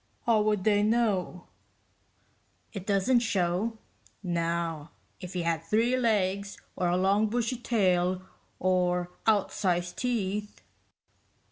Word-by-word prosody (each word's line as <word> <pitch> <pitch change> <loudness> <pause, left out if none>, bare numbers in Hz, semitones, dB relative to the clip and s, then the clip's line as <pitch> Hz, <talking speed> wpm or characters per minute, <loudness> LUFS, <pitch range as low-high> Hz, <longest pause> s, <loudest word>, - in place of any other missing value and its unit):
"How 225 -3 +4
would 210 -2 +1
they 205 -1 +3
know? 210 -5 0 1.3
It 195 -3 -7
doesn't 205 +5 +3
show. 205 0 0 0.5
Now 170 -3 -2 0.3
if 180 0 -8
you 175 - -1
had 165 -1 -1
three 225 +9 +2
legs, 200 -5 0 0.2
or 180 - 0
a 175 +1 +2
long 200 +3 +3
bushy 240 +2 -1
tail, 185 -6 +1 0.3
or 180 -1 +1 0.2
outsized 185 -4 +1
teeth...." 210 -4 -2
195 Hz, 110 wpm, -28 LUFS, 180-220 Hz, 1.3 s, How